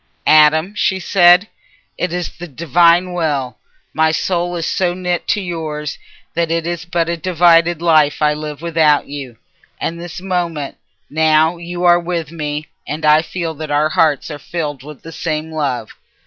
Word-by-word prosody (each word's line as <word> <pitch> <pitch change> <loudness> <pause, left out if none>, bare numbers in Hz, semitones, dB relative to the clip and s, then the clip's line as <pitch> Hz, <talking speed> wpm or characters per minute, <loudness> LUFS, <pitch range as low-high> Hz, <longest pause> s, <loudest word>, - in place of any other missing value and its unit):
"Adam," 155 +4 +5
she 190 -2 0
said, 180 +1 +5 0.5
"it 180 - -2
is 180 0 -3
the 175 - -6
Divine 170 +4 +3
Will. 145 -8 -2 0.4
My 160 +1 +3
soul 175 +2 -1
is 165 -1 -3
so 180 0 0
knit 180 -1 -2
to - - +1
yours 155 -4 -5 0.3
that 170 -1 0
it 165 0 -1
is 175 0 -4
but 170 -1 -1
a 170 - -1
divided 170 -1 +3
life 155 -3 +3
I 150 0 +3
live 150 0 -7
without 160 -3 +2
you. 135 -5 -7 0.4
And 170 +1 -3
this 175 0 -7
moment, 175 -6 -3 0.3
now 160 +2 +2
you 175 +1 -6
are 175 0 +5
with 170 -3 -4
me, 150 -2 -4 0.2
and 155 +1 -4
I 150 +1 +6
feel 165 0 -4
that 155 0 -7
our 150 +1 +2
hearts 155 -1 +1
are 145 - -7
filled 145 -2 -4
with 150 0 -12
the 165 - -9
same 160 -1 -3
love. 135 -8 -2
165 Hz, 170 wpm, -17 LUFS, 150-175 Hz, 0.5 s, I